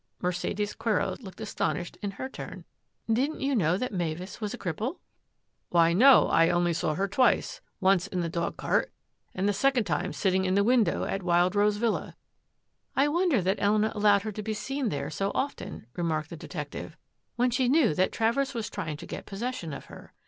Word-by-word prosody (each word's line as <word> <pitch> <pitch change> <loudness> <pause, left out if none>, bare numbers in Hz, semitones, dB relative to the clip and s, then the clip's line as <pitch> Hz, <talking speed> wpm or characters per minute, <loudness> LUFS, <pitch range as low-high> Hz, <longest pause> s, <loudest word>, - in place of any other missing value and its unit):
Mercedes 180 +3 -2
Quero 225 -2 0
looked 190 -6 -11
astonished 180 -4 -2
in 205 - -2
her 260 - -3
turn. 265 - -9 0.2
" 225 - -4
Didn't 295 +3 -2
you 275 0 0
know 180 -4 +2
that 250 +1 -3
Mavis 175 +3 -4
was 210 -1 -2
a 245 - -5
cripple? 215 - -3 0.2
" - - -49
" - - -50
Why, 170 -1 +4
no; 255 +8 +7
I 165 0 +4
only 175 0 +2
saw 155 -1 -1
her 195 +4 0
twice. 255 - +2 0.2
Once 190 0 +3
in 185 -3 -2
the 170 - -1
dogcart, 170 +1 -1 0.4
and 190 +2 0
the 205 - +2
second 270 +2 +2
time 155 -7 -1
sitting 190 +3 +1
in 185 0 +1
the 200 - +4
window 235 -1 +3
at 195 - -2
Wild 175 0 +3
Rose 205 0 +3
Villa." 230 0 -1 0.4
" - - -48
I 280 +2 +3
wonder 325 - +2
that 190 +3 +1
Elena 210 +1 +3
allowed 205 -1 +4
her 215 - -3
to 210 - -5
be 215 +1 -3
seen 270 +3 -2
there - - -3
so 195 0 -1
often," 275 - -3
remarked 160 -3 -2
the - - -5
detective, 155 0 -7 0.2
" - - -50
when 245 +1 +2
she 255 0 +1
knew 280 - +4
that 185 +5 +1
Travers 255 +4 0
was 225 -2 -3
trying 155 -2 -4
to - - -9
get - - -7
possession 205 -4 -4
of 140 - -7
her. - - -13
200 Hz, 205 wpm, -28 LUFS, 175-240 Hz, 0.4 s, no